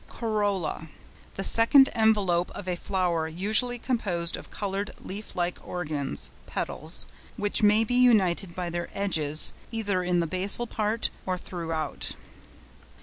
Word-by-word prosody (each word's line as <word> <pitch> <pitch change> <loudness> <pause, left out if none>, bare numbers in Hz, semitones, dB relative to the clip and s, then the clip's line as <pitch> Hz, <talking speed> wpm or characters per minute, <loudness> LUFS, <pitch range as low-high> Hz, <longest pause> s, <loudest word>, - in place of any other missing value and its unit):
COROLLA.—The 200 -5 -4
second 265 +7 +6
envelope 205 -6 +2
of 195 - -8
a 180 - -1
flower 175 -3 -1
usually 215 +9 0
composed 190 -9 -1
of - - -11
coloured, 200 0 -4
leaf 205 +3 -8
like 175 0 -1
organs 150 - -2 0.2
(petals), - - +1 0.3
which 205 +2 0
may 210 +1 +5
be 225 - -2
united 195 -8 +3
by 180 -2 -3
their 170 0 -4
edges 155 -6 +1 0.2
either 205 -5 -1
in 180 -1 +1
the 170 - +1
basal 185 +7 +2
part 220 0 -1 0.2
or 185 -1 0
throughout. 165 -3 -3
190 Hz, 130 wpm, -27 LUFS, 175-215 Hz, 0.3 s, second